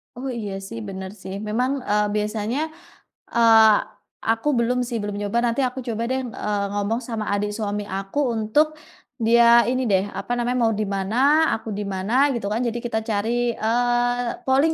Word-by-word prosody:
Oh, 260 +3 -5
iya 215 -5 -4
sih, 230 +4 -7
bener 190 -1 -6
sih, 190 +1 -6
memang, 250 +5 0 0.2
eee, 210 0 +2
biasanya, 210 +4 -1 0.8
eee 225 -2 +7 0.5
aku 225 +6 +1
belum 245 +2 +1
sih 240 -1 -2
belum 205 -1 -4
nyoba, 205 +3 -1
nanti 235 +3 0
aku 255 0 -1
coba 230 -1 -2
deh, 260 0 0
eee, 210 -4 -2
ngomong 205 +4 -1
sama 225 -3 -3
adik 205 +1 -1
suami 210 -1 -3
aku, 195 +7 -4
untuk 225 +8 +2 0.5
dia 235 +1 +6
ini 255 +1 0
deh, 190 0 +3
apa - - -5
namanya, 245 +1 -1
mau 225 -1 +3
di - - +2
mana, 195 +3 -2 0.4
aku 220 0 -7
di 210 - -2
mana, 195 +3 -3 0.2
gitu 230 -5 -3
kan. 220 - 0
Jadi 235 0 -2
kita 220 -2 0
cari, 235 +3 0
eee, 245 +1 0
polling 275 +5 +3
225 Hz, 175 wpm, -23 LUFS, 210-240 Hz, 0.8 s, eee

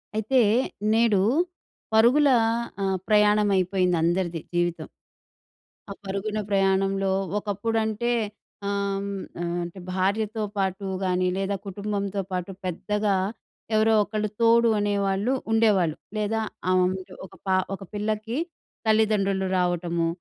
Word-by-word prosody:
అయితే, 220 +5 +2 0.5
నేడు 225 -3 +4 0.7
పరుగుల 255 +7 +5 0.5
ఆహ్, 190 -1 +1
ప్రయాణం 210 0 +4
అయిపోయింది 185 -1 +1
అందరిది 170 -1 0
జీవితం... 175 -1 -1 1.0
ఆ - - -4
పరుగున 200 +2 -2
ప్రయాణంలో 195 0 +2 0.3
ఒకప్పుడంటే 220 +2 -1 0.6
ఆహ్, 200 -1 -1
హ్మ్, 200 -1 -4 0.2
ఆహ్, 175 0 -2
అంటే 175 +2 -8
భార్యతో 205 +4 0
పాటు 195 0 -1 0.2
గాని, 185 0 +1
లేదా 195 +1 -1
కుటుంబంతో 200 0 -3
పాటు 180 +1 -3
పెద్దగా 205 +3 0 0.6
ఎవరో 220 +1 +4
ఒకళ్ళు 215 0 -2
తోడు 230 0 +5
అనేవాళ్ళు 200 +2 0 0.2
ఉండేవాళ్ళు. 205 -8 +3 0.2
లేదా, 215 +1 0 0.3
ఆ - - +4
వం 180 0 +3 0.3
ఒక - - -15
పా 190 - +3 0.2
ఒక 195 - -6
పిల్లకి 215 +3 -2 0.5
తల్లిదండ్రులు 205 -3 +2
రావటము. 175 -1 0
200 Hz, 110 wpm, -25 LUFS, 190-215 Hz, 1.0 s, పరుగుల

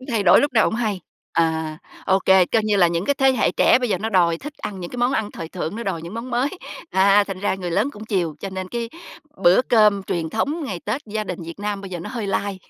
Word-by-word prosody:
Cứ 255 - -11
thay 225 -3 +1
đổi 185 - +6
lúc 285 -2 0
nào 225 - +4
hổng - - -1
hay, 215 -5 -1 0.3
à, 160 -1 0 0.3
ô 190 +1 +4
kê, 190 -2 +5
coi 225 - +1
như 210 -1 +2
là 180 - +5
những 170 +2 -1
cái 285 - +1
thế 270 -1 +3
hệ 245 - +1
trẻ - - +4
bây 245 - -1
giờ - - 0
nó 220 - -2
đòi 170 -4 +3
thích 295 +1 -8
ăn 195 -2 -5
những 175 - -6
cái 250 - -7
món 245 +2 +1
ăn 210 -1 -1
thời 165 - -7
thượng, 180 +2 -5
nó 235 - -4
đòi 180 -6 -3
những 170 +5 -8
món 230 +3 -6
mới, 250 +3 +1 0.4
à, 200 +2 +4
thành 195 -2 -6
ra 200 - 0
người 180 -2 -5
lớn 265 +11 +1
cũng 210 +1 -10
chiều, 175 -8 -1
cho 195 - -5
nên 185 0 -5
cái 235 +1 -4 0.5
bữa 180 +8 +6
cơm 210 -5 +4
truyền 165 -4 -3
thống 290 - -1
ngày 185 -9 -5
Tết 220 +7 -2
gia 215 0 -3
đình 180 -3 -5
Việt 165 +2 -9
Nam 205 -1 -3
bây 195 -1 -9
giờ 175 - -4
nó 170 - -7
hơi 230 -5 -4
lai. 200 0 -2
200 Hz, 285 wpm, -22 LUFS, 180-230 Hz, 0.5 s, đổi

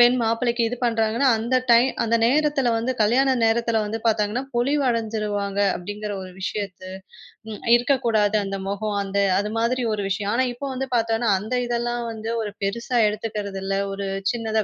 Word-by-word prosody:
பெண் 240 +1 +6
மாப்பிள்ளைக்கு 235 +1 +1
இது 245 - -4
பண்றாங்கன்னா. 230 +3 +2
அந்த 245 +3 +1
டைம் 245 +3 +5
அந்த 230 0 +2
நேரத்துல 280 -2 +2
வந்து 255 +3 -1
கல்யாண 260 +5 +3
நேரத்துல 230 0 +1
வந்து 225 +2 -4
பாத்தாங்கன்னா, 220 +4 0
பொலிவு 275 +4 +1
அடைஞ்சுருவாங்க 210 -3 -2 0.2
அப்டிங்கிற 205 +3 -6
ஒரு 185 - -10
விஷயத்த, 195 -2 -4 0.7
ம். 210 - -7 0.2
இருக்கக் 260 +2 0
கூடாது 215 -1 +2
அந்த 195 0 -4
முகம். 205 +1 -2
அந்த 200 +1 -2 0.2
அது 210 +1 -2
மாதிரி 245 +2 0
ஒரு 205 - -3
விஷயம். 200 +1 -1
ஆனா 260 +1 +2
இப்ப 280 +4 -7
வந்து 265 +1 -3
பாத்தோன்னா 225 0 0
அந்த 220 +6 -6
இதெல்லாம் 240 0 -1
வந்து 225 0 -5
ஒரு 210 - -5
பெருசா 235 +4 -1
எடுத்துக்கிறதில்ல. 200 -3 -4 0.2
ஒரு 200 0 -4 0.3
சின்னதா 220 -2 -1
225 Hz, 165 wpm, -23 LUFS, 210-240 Hz, 0.7 s, பெண்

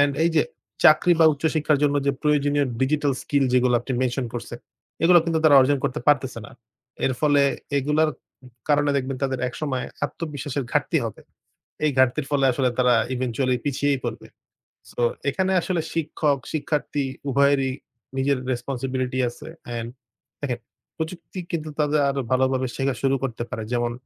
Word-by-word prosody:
and 145 0 +4
এই 170 - +3
যে 155 - +6 0.4
চাকরি 155 +3 +6
বা 160 - +7
উচ্চ 145 +2 -9
শিক্ষার 150 -1 +2
জন্য 145 0 +2
যে 140 - +3
প্রয়োজনীয় 145 -1 +2
ডিজিটাল 145 +1 +1
স্কিল 140 -1 +1
যেগুলো 125 -1 +3
আপনি 130 - -5
মেনশন 125 0 -1
করছেন 120 0 -6 0.5
এগুলো 175 +1 +7
কিন্তু 165 -1 0
তারা 145 -3 +8
অর্জন 140 +2 +3
করতে 125 - -1
পারতেছে 135 -4 +2
না। - - -14 0.6
এর 130 - +1
ফলে 145 -2 +4 0.4
এগুলার 150 +3 +2 0.6
কারণে 145 -1 +3
দেখবেন 135 0 -2
তাদের 135 -1 0
একসময় 130 0 -3 0.2
আত্মবিশ্বাসের 145 -4 -4
ঘাটতি 150 +3 +2
হবে। 115 - -6 0.7
এই 150 - +3
ঘাটতির 130 +3 +3
ফলে 140 -2 +2
আসলে 130 +1 +1
তারা 125 -1 +5 0.2
eventually 125 +1 0
পিছিয়েই 140 -1 0
পড়বে। - - -5 0.6
So - - -5 0.3
এখানে 190 +6 0
আসলে 175 -1 -1
শিক্ষক-শিক্ষার্থী 150 -1 -1 0.3
উভয়েরই 140 0 +3 0.5
নিজের 135 0 +2
responsibility 130 0 -2
আছে 120 - -12 0.3
and 115 0 -4 0.5
দেখেন 125 -4 -2 0.4
প্রযুক্তি 170 +3 -6
কিন্তু 155 -3 -3
তাদের 150 0 +2
আরো 140 0 -1
ভালোভাবে 130 0 +2
শেখা 135 -1 0
শুরু 135 0 +2
করতে 120 -3 -3
পারে। 110 - -4
যেমন 120 0 0
140 Hz, 150 wpm, -24 LUFS, 130-150 Hz, 0.7 s, তারা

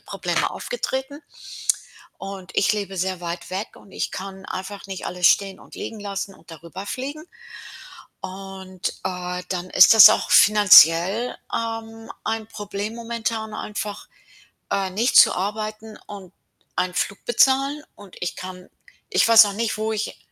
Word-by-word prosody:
Probleme - - -2
aufgetreten. 285 - -5 1.0
Und 195 -1 -9
ich 205 - +3
lebe 200 -2 -5
sehr 185 0 -2
weit 170 0 -6
weg 190 +3 -5
und 195 - -18
ich - - -4
kann 190 0 -8
einfach 195 +2 -7
nicht 190 -1 -7
alles 180 0 +2
stehen 195 -1 +1
und - - -15
liegen 220 - -7
lassen 200 -1 -5
und 165 - -22
da 165 - -9
rüber 185 +4 -8
fliegen. 285 +8 -6 1.0
Und, 190 -1 -6 0.2
äh, 180 -1 -4
dann 185 0 -4
ist 185 +4 +7
das 220 -1 +11
auch - - -1
finanziell, 200 +1 +6 0.2
ähm, 225 0 -5
ein 220 -1 -3
Problem 205 0 -6
momentan 230 -2 -4
einfach, 210 -1 -6 0.6
äh, 195 -1 -1
nicht 230 +7 0
zu - - +8
arbeiten 215 +2 -5
und 195 -3 -11 0.4
einen 180 0 -1
Flug 200 - -3
bezahlen. 270 +4 +2
Und 200 -3 -15
ich 180 - -3
kann 185 0 -9 0.4
ich 400 - +3
weiß 230 -1 +9
noch 205 - -3
nicht, 220 0 -2
wo 220 +1 -2
ich 215 0 -4
200 Hz, 150 wpm, -22 LUFS, 185-225 Hz, 1.0 s, das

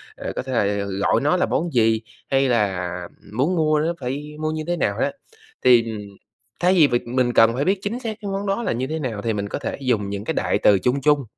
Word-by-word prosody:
ờ, - - -5
có - - -1
thể 130 - -6
là 100 -3 +1
gọi 100 0 +1
nó 150 +6 +2
là - - +2
món 170 +1 -1
gì 110 -2 +3 0.3
hay 135 0 +2
là 95 -7 0 0.4
muốn 140 +11 +1
mua 155 -2 +2
nó 160 +3 0
phải 140 +4 -5
mua 155 0 -1
như 155 0 -3
thế 175 0 0
nào - - 0
á, 275 +1 +1 0.5
thì, 120 -2 +6
ừm 105 -2 -5 0.6
thay 180 +1 +3
vì 165 -6 +6
việc 120 -2 -1
mình 125 0 +1
cần 115 0 +5
phải 135 +4 -1
biết 190 +1 +2
chính 225 +4 -3
xác 225 -4 -5
cái 200 -2 -4
món 195 +1 -3
đó 195 +4 0
là - - 0
như 125 +3 -2
thế 160 +2 -3
nào 120 -8 -3
thì 115 +1 -1
mình 100 -1 -3
có - - -3
thể - - -4
dùng 110 -6 0
những 100 0 -4
cái - - -2
đại - - 0
từ 100 -2 +5
chung 125 +7 0
chung. 145 0 +3
130 Hz, 260 wpm, -22 LUFS, 110-160 Hz, 0.6 s, thì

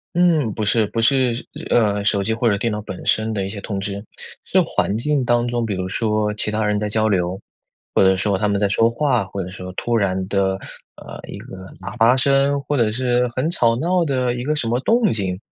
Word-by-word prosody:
嗯， 165 - +3
不 110 - -3
是 110 0 +2
不 115 - -2
是 125 -1 +2 0.2
呃， 105 -3 +2
手 100 -1 +1
机 110 - 0
或 115 +1 +1
者 100 - +1
电 115 +2 -1
脑 105 0 -3
本 95 -3 -8
身 110 0 +1
的 100 -2 -2
一 - - -4
些 100 -1 -7
通 100 -1 -4
知， 100 +1 -4 0.4
是 - - +2
环 105 - -1
境 140 +1 0
当 120 0 +2
中， 120 -1 -1
比 105 - -2
如 95 0 -3
说 105 0 0
其 105 - -2
他 110 0 -1
人 105 0 +1
在 105 0 -2
交 110 +1 +2
流， 95 -2 0 0.5
或 - - +4
者 95 0 +5
说 100 +1 0
他 105 +1 0
们 100 -1 0
在 105 - +2
说 115 +3 +3
话， 125 -3 0
或 95 0 -5
者 90 - -7
说 95 -1 -8
突 120 +4 -1
然 95 -3 0
的， 95 -1 0 0.4
呃， - - -10
一 - - -7
个 - - -10 0.3
喇 - - -7
叭 120 +3 +5
声， 140 +1 +2
或 145 +2 -2
者 115 -3 +2
是 125 +1 +1
很 140 +6 0
吵 115 -8 +3
闹 170 +6 +1
的 130 -3 0
一 125 0 -4
个 150 +2 0
什 135 -6 -2
么 120 +2 +1
动 225 - +2
静， 95 -4 -2
110 Hz, 255 characters per minute, -20 LUFS, 100-125 Hz, 0.5 s, 者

